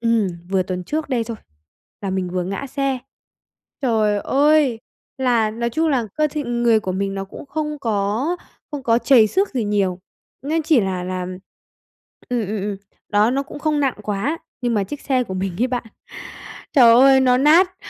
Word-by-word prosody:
ừm, 230 Hz, -4 st, +2 dB, 0.2 s
vừa 190 Hz, -1 st, +2 dB
tuần 180 Hz, 0 st, -5 dB
trước 305 Hz, -, -3 dB
đây 240 Hz, -4 st, 0 dB
thôi 230 Hz, 0 st, -6 dB, 0.7 s
là 195 Hz, -, -2 dB
mình 185 Hz, -2 st, -2 dB
vừa 180 Hz, -1 st, -2 dB
ngã 195 Hz, +9 st, -4 dB
xe. 275 Hz, -1 st, -1 dB, 0.8 s
Trời 215 Hz, -5 st, +2 dB
ơi! 285 Hz, -4 st, +3 dB, 0.4 s
Là 240 Hz, -4 st, +2 dB
nói 235 Hz, +2 st, -2 dB
chung 320 Hz, +7 st, +1 dB
là 255 Hz, -6 st, +1 dB
cơ 305 Hz, 0 st, +1 dB
thể 295 Hz, 0 st, -3 dB
người 240 Hz, -2 st, +2 dB
của 190 Hz, -3 st, -3 dB
mình 195 Hz, +1 st, -2 dB
nó 195 Hz, 0 st, -3 dB
cũng 200 Hz, -, -11 dB
không 300 Hz, 0 st, -3 dB
có 225 Hz, -, 0 dB, 0.3 s
không 290 Hz, -2 st, -5 dB
có 230 Hz, -2 st, +3 dB
trầy 245 Hz, -3 st, +5 dB
xước 390 Hz, -, +1 dB
gì 250 Hz, -5 st, -2 dB
nhiều, 195 Hz, -3 st, 0 dB, 0.4 s
nên 315 Hz, +3 st, 0 dB
chỉ 305 Hz, -4 st, +4 dB
là 185 Hz, -3 st, -2 dB
là 185 Hz, 0 st, -3 dB, 1.1 s
ừm, 240 Hz, -4 st, -1 dB
ừm, 210 Hz, +1 st, -3 dB
ừm, 205 Hz, 0 st, -3 dB, 0.3 s
đó, 210 Hz, +2 st, +3 dB
nó 275 Hz, +2 st, 0 dB
cũng 280 Hz, -, -10 dB
không 300 Hz, 0 st, 0 dB
nặng 270 Hz, -3 st, +1 dB
quá, 210 Hz, +11 st, -2 dB, 0.2 s
nhưng 240 Hz, -2 st, 0 dB
mà 200 Hz, -2 st, +1 dB
chiếc 290 Hz, +6 st, -7 dB
xe 255 Hz, -3 st, 0 dB
của 190 Hz, -, -6 dB
mình 185 Hz, +2 st, -2 dB
ấy 250 Hz, -, +4 dB
bạn, 245 Hz, -2 st, -3 dB, 0.9 s
trời 240 Hz, -5 st, +7 dB
ơi, 265 Hz, +2 st, +6 dB
nó 250 Hz, -1 st, +4 dB
nát 345 Hz, +6 st, +4 dB
235 Hz, 190 wpm, -21 LUFS, 205-275 Hz, 1.1 s, trời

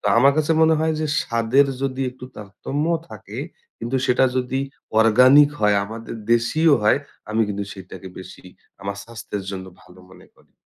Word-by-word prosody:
তো -, -, -5 dB
আমার 140 Hz, +3 st, +6 dB
কাছে 155 Hz, +1 st, +2 dB
মনে 160 Hz, 0 st, +5 dB
হয়, 160 Hz, 0 st, +1 dB
যে 155 Hz, -, 0 dB, 0.2 s
স্বাদের 115 Hz, +4 st, +2 dB, 0.2 s
যদি 135 Hz, -1 st, -2 dB
একটু 125 Hz, 0 st, -12 dB
তারতম্যও 145 Hz, -, -3 dB
থাকে, -, -, -9 dB, 0.4 s
কিন্তু 125 Hz, +3 st, -2 dB
সেটা 125 Hz, +1 st, +3 dB
যদি 130 Hz, +1 st, -1 dB, 0.4 s
অর্গানিক 130 Hz, +6 st, +6 dB
হয়, 105 Hz, -1 st, +3 dB
আমাদের 115 Hz, +2 st, -8 dB, 0.2 s
দেশিও 145 Hz, +7 st, +3 dB
হয়, 105 Hz, +6 st, +4 dB, 0.3 s
আমি 110 Hz, +1 st, 0 dB
কিন্তু 100 Hz, 0 st, -3 dB
সেটাকে 95 Hz, 0 st, -10 dB
বেশি 95 Hz, 0 st, -12 dB, 0.4 s
আমার 100 Hz, 0 st, -4 dB
স্বাস্থ্যের 110 Hz, -3 st, -7 dB
জন্য 95 Hz, -1 st, -6 dB, 0.2 s
ভালো 90 Hz, +1 st, -17 dB
মনে -, -, -16 dB
করি। -, -, -28 dB
120 Hz, 165 wpm, -22 LUFS, 105-140 Hz, 0.4 s, আমার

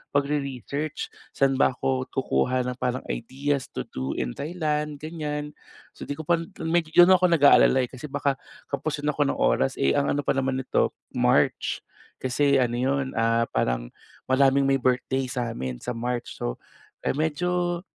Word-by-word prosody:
pagre-research 140 Hz, +1 st, -2 dB, 0.2 s
saan 135 Hz, -1 st, +2 dB
ba 130 Hz, -, +3 dB
ako 130 Hz, 0 st, -1 dB
kukuha 125 Hz, -, +1 dB
ng 125 Hz, -, -8 dB
parang 125 Hz, 0 st, -1 dB
ideas 135 Hz, -, -2 dB
to -, -, -5 dB
do 65 Hz, +1 st, -3 dB
in 60 Hz, -1 st, -2 dB
Thailand 150 Hz, -, -2 dB
ganyan 150 Hz, -2 st, -4 dB, 0.4 s
so, -, -, -9 dB
di 145 Hz, -, -3 dB
ko 160 Hz, -, -7 dB
pa 170 Hz, +2 st, +2 dB, 0.2 s
medy 165 Hz, -1 st, 0 dB
don 175 Hz, +1 st, +8 dB
ako 185 Hz, -1 st, +6 dB
nag-aalala 145 Hz, -5 st, +6 dB
eh, 125 Hz, -, -4 dB
kasi 130 Hz, +3 st, -8 dB
baka 140 Hz, -1 st, 0 dB, 0.4 s
kapusin 150 Hz, +1 st, -2 dB
ako 145 Hz, -1 st, +1 dB
ng -, -, 0 dB
oras 65 Hz, +2 st, +2 dB
eh 70 Hz, -, +2 dB
ang 140 Hz, -, +1 dB
ano 145 Hz, -, -1 dB
pa -, -, +1 dB
naman 135 Hz, -1 st, 0 dB
nito -, -, +1 dB, 0.2 s
March -, -, +1 dB, 0.4 s
kasi 140 Hz, +2 st, +2 dB
ano 120 Hz, -2 st, +1 dB
'yon, 135 Hz, +2 st, 0 dB
ah, 115 Hz, 0 st, +2 dB
parang, -, -, -1 dB, 0.4 s
maraming 135 Hz, +1 st, +4 dB
may 135 Hz, -, +4 dB
birthday 130 Hz, +1 st, +1 dB
sa 125 Hz, -2 st, -2 dB
amin 65 Hz, -2 st, -4 dB
sa -, -, -2 dB
March 120 Hz, +1 st, -3 dB
so -, -, -2 dB, 0.6 s
medyo, 175 Hz, +3 st, 0 dB
135 Hz, 165 wpm, -25 LUFS, 125-150 Hz, 0.6 s, don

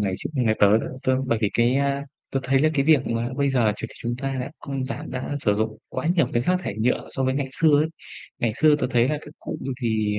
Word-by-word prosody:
ngày 100 Hz, -2 st, 0 dB
x -, -, -3 dB
nhà 120 Hz, -5 st, +2 dB
tớ 105 Hz, +2 st, +6 dB
đó -, -, -4 dB, 0.2 s
tớ 130 Hz, 0 st, +2 dB
bởi 115 Hz, -3 st, +1 dB
vì 105 Hz, -, +2 dB
cái, 120 Hz, +2 st, +3 dB
a 140 Hz, 0 st, 0 dB, 0.3 s
tớ 135 Hz, -, 0 dB
thấy 135 Hz, 0 st, +2 dB
là 155 Hz, -, +4 dB
cái 140 Hz, -, +2 dB
việc 150 Hz, -3 st, +4 dB
mà 115 Hz, +1 st, -1 dB
bây 140 Hz, -1 st, +2 dB
giờ 120 Hz, -5 st, +3 dB
chuyện -, -, -5 dB
chúng 120 Hz, 0 st, -3 dB
ta 135 Hz, 0 st, -2 dB
đã 130 Hz, +3 st, -4 dB
không 135 Hz, -2 st, -4 dB
giảm 130 Hz, -, -5 dB
đã 130 Hz, +3 st, -4 dB
sử 105 Hz, -6 st, +2 dB
dụng 110 Hz, +1 st, -2 dB
quá -, -, -4 dB
nhiều 170 Hz, -, +3 dB
cái 120 Hz, -, +2 dB
rác 180 Hz, +9 st, +2 dB
thải 105 Hz, -, -4 dB
nhựa 120 Hz, +3 st, +1 dB
so 135 Hz, -, -1 dB
với 130 Hz, -, +1 dB
ngày 140 Hz, -1 st, -1 dB
xưa 155 Hz, 0 st, +4 dB
ấy. 155 Hz, -, +2 dB, 0.5 s
Ngày 115 Hz, -2 st, 0 dB
xưa 150 Hz, +3 st, +5 dB
tớ 145 Hz, -, -1 dB
thấy 120 Hz, -1 st, +3 dB
là 150 Hz, 0 st, 0 dB
các 150 Hz, -, -11 dB
cụ -, -, -5 dB
như 135 Hz, +1 st, -3 dB
thì, 110 Hz, -3 st, 0 dB
130 Hz, 275 wpm, -24 LUFS, 115-140 Hz, 0.5 s, tớ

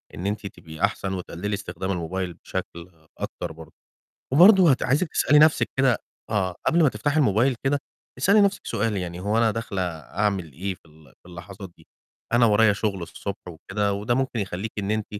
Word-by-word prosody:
إن 90 Hz, -, -6 dB
أنتِ 105 Hz, 0 st, -3 dB
تبقي 80 Hz, -3 st, -12 dB
أحسن 95 Hz, -1 st, 0 dB
وتقلِّلي 95 Hz, +2 st, -4 dB
استخدام 95 Hz, -1 st, -4 dB
الموبايل 90 Hz, 0 st, -3 dB
بشكل 85 Hz, +1 st, -7 dB, 0.3 s
أكتر -, -, -5 dB
برضه، 80 Hz, 0 st, -13 dB, 0.6 s
وبرضه 180 Hz, +2 st, +7 dB
هت 130 Hz, -, +1 dB
عايزِك 145 Hz, +7 st, +1 dB
تسألي 150 Hz, -, +4 dB
نَفْسِك 155 Hz, 0 st, +4 dB
كده 130 Hz, -3 st, +3 dB, 0.3 s
آه، 95 Hz, -5 st, 0 dB
قبل 170 Hz, +1 st, +4 dB
ما 150 Hz, -, +5 dB
تفتحي 145 Hz, +3 st, -1 dB
الموبايل 125 Hz, 0 st, +3 dB
كده، 140 Hz, +1 st, +1 dB, 0.4 s
اسألي 200 Hz, +11 st, +4 dB
نَفْسِك 200 Hz, 0 st, +1 dB
سؤال، 105 Hz, 0 st, -1 dB
يعني 90 Hz, -1 st, -4 dB
"هو 105 Hz, +4 st, 0 dB
أنا 115 Hz, -1 st, +3 dB
داخلة 110 Hz, -3 st, -3 dB
أعمل 90 Hz, +1 st, -2 dB
إيه 95 Hz, +6 st, -3 dB
في -, -, -33 dB
ال 80 Hz, -1 st, -20 dB, 0.2 s
في 90 Hz, -, -15 dB
اللحظات 95 Hz, +2 st, -10 dB
دي؟ 80 Hz, -, -21 dB, 0.5 s
أنا 120 Hz, 0 st, +5 dB
ورايا 105 Hz, -1 st, +5 dB
شُغل 100 Hz, -2 st, -2 dB
الصبح 95 Hz, +3 st, -7 dB
وكده،" 100 Hz, +5 st, -2 dB
وده 105 Hz, +4 st, -1 dB
ممكن 130 Hz, -2 st, -1 dB
يخلّيكِ 100 Hz, +2 st, -4 dB
إن 100 Hz, +1 st, -2 dB
أنتِ 110 Hz, -1 st, -1 dB
100 Hz, 180 wpm, -24 LUFS, 90-120 Hz, 0.6 s, وبرضه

